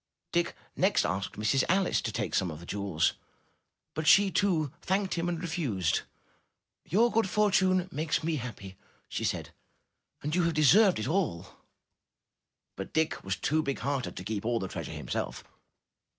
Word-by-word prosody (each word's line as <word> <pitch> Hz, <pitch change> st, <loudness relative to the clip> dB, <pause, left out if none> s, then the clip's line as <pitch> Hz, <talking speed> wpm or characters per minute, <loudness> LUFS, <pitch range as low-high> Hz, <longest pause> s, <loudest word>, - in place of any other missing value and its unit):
'' -, -, -57 dB
Dick 170 Hz, 0 st, 0 dB, 0.2 s
next -, -, +3 dB
asked 95 Hz, +2 st, -2 dB
Mistress 110 Hz, +6 st, +2 dB
Alice 190 Hz, +1 st, +2 dB
to -, -, -3 dB
take -, -, -3 dB
some 95 Hz, -, +1 dB
of 75 Hz, -2 st, -7 dB
the 85 Hz, -, -11 dB
jewels, 100 Hz, -5 st, 0 dB, 0.8 s
but 155 Hz, 0 st, -3 dB
she 200 Hz, -1 st, +7 dB
too 165 Hz, -9 st, +1 dB
thanked 190 Hz, +1 st, 0 dB
him 170 Hz, 0 st, -1 dB
and 170 Hz, -2 st, -2 dB
refused. 135 Hz, -, -1 dB, 0.8 s
"Your 230 Hz, +8 st, +3 dB
good 225 Hz, -3 st, +2 dB
fortune 185 Hz, -3 st, +3 dB
makes 155 Hz, 0 st, -1 dB
me 160 Hz, -1 st, 0 dB
happy," 105 Hz, -7 st, -7 dB, 0.3 s
she -, -, -4 dB
said, -, -, -2 dB, 0.7 s
"and 150 Hz, +1 st, -2 dB
you 180 Hz, -, +3 dB
have 170 Hz, -1 st, 0 dB
deserved 180 Hz, -, +6 dB
it 110 Hz, -, -3 dB
all!" 160 Hz, -, -1 dB, 1.2 s
But 95 Hz, -, -7 dB
Dick 160 Hz, 0 st, 0 dB
was 95 Hz, 0 st, -1 dB
too 155 Hz, +1 st, +1 dB
big 140 Hz, -3 st, -2 dB
hearted 140 Hz, -2 st, -2 dB
to 90 Hz, -, -5 dB
keep 105 Hz, +1 st, -3 dB
all 120 Hz, +1 st, +1 dB
the 95 Hz, -, -2 dB
treas -, -, -5 dB
ure -, -, -7 dB
himself. -, -, -4 dB
155 Hz, 170 wpm, -29 LUFS, -, 1.2 s, she